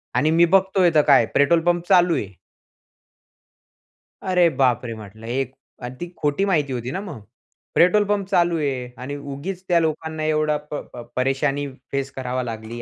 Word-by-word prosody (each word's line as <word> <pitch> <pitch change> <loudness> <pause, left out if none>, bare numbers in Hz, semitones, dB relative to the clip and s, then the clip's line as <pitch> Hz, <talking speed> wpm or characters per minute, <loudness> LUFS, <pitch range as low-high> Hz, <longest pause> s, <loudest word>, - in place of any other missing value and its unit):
आणि 155 +1 +2
मी 170 +1 +5
बघतोय 190 -1 +4
तर 150 - +7
काय, 140 - +6
पेट्रोल 165 +4 +4
पंप 175 0 0
चालू 180 -3 +4
आहे. 105 - -2 2.0
अरे 180 -2 +3
बाप 130 -4 +1
रे! 115 - -4
म्हटलं 110 +1 -11
एक 130 +1 -2 0.3
अन् 125 +1 -6
ती 175 - -5
खोटी 150 +7 0
माहिती 150 -8 0
होती 120 +1 -4
ना 190 - -3
मग. 180 - -9 0.5
पेट्रोल 185 +4 +5
पंप 200 -2 0
चालू 175 -3 +2
आहे 135 -5 -2
आणि 135 +3 -5
उगीच 145 +7 -6
त्या 175 -2 +4
लोकांना 160 -1 -2
एवढा 155 -1 +1 0.2
प - - -3 0.2
प 120 - -7
परेशानी 135 +2 0 0.2
फेस 140 0 -2
करावा 130 -1 -3
लागली. 115 0 -6
150 Hz, 170 wpm, -22 LUFS, 130-175 Hz, 2.0 s, तर